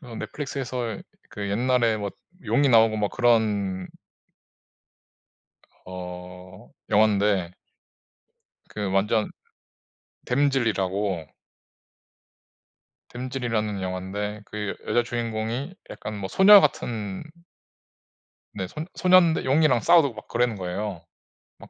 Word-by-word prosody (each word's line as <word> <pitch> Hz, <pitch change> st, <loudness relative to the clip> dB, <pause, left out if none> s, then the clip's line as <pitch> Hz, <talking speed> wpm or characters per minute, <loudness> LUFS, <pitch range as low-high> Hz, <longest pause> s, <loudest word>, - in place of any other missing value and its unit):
그 -, -, -14 dB
넷플릭스에서 125 Hz, -2 st, -5 dB, 0.3 s
그 100 Hz, -1 st, -5 dB
옛날에 120 Hz, +1 st, +2 dB
뭐 100 Hz, -1 st, -4 dB, 0.3 s
용이 140 Hz, 0 st, +2 dB
나오고 115 Hz, -2 st, +5 dB
막 105 Hz, -1 st, -1 dB
그런 105 Hz, -6 st, +1 dB, 2.0 s
어 90 Hz, +1 st, -10 dB, 0.2 s
영환데 100 Hz, -4 st, +2 dB, 1.2 s
그 105 Hz, -2 st, -4 dB
완전 105 Hz, +3 st, +1 dB, 1.0 s
댐즐이라고 105 Hz, -, 0 dB, 1.8 s
댐즐이라는 120 Hz, -5 st, -3 dB
영화인데 95 Hz, +3 st, -4 dB
그 105 Hz, -1 st, -4 dB
여자 120 Hz, -, +2 dB
주인공이 120 Hz, +6 st, -3 dB, 0.2 s
약간 105 Hz, 0 st, -7 dB
뭐 100 Hz, -2 st, -5 dB
소녀 200 Hz, -, +8 dB
같은 105 Hz, -, -2 dB, 1.3 s
네 95 Hz, -2 st, -3 dB
손 155 Hz, -, -6 dB
소년데 180 Hz, -3 st, +4 dB
용이랑 135 Hz, -2 st, +3 dB
싸우고 150 Hz, -6 st, +4 dB
막 105 Hz, -, -11 dB
그러는 120 Hz, -2 st, 0 dB
거예요. 95 Hz, 0 st, -5 dB, 0.5 s
막 -, -, -15 dB
110 Hz, 205 characters per minute, -25 LUFS, 100-125 Hz, 2.0 s, 소녀